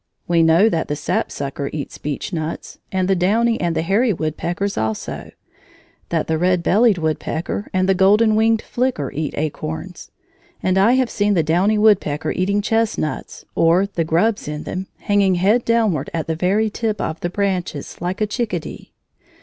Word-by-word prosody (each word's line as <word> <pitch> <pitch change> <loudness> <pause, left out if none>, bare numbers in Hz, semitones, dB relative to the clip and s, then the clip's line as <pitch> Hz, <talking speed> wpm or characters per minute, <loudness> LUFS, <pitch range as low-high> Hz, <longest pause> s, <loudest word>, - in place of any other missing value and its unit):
We 170 -1 +3
know 165 +6 +5
that 165 -7 0
the 145 - -2
sapsucker 140 -1 -3
eats 150 -2 -6
beechnuts, 155 +2 -5
and 185 -1 0
the 195 - +3
downy 225 +6 +2
and 170 -2 0
the - - 0
hairy 215 +7 +2
woodpeckers 175 +4 -2
also; 110 -1 -3 0.8
that - - 0
the 160 -1 -1
red 180 0 +2
bellied 215 +1 +4
woodpecker 160 +4 -2
and 185 0 +1
the 195 - +4
golden 210 +4 +4
winged 225 0 +2
flicker 245 - -1
eat 150 0 -3
acorns; 155 +4 -5 0.5
and 185 0 +2
I 215 +5 +5
have 260 -2 +1
seen 205 0 +1
the 165 - +3
downy 180 +7 +2
woodpecker 200 -8 +2
eating 200 +2 0
chestnuts, 225 -8 -2
or 170 +4 +3
the 190 -4 -2
grubs 175 +7 +1
in 150 0 -4
them, 185 +1 -5
hanging 200 -2 +2
head 205 +7 +2
downward 215 -11 +1
at 160 - -2
the 160 - -2
very 200 +6 +1
tip 215 -1 -2
of 160 - -3
the 175 - -2
branches 185 -7 -3
like 180 +4 -3
a - - +4
chickadee. 210 -6 -4
185 Hz, 165 wpm, -20 LUFS, 160-210 Hz, 0.8 s, know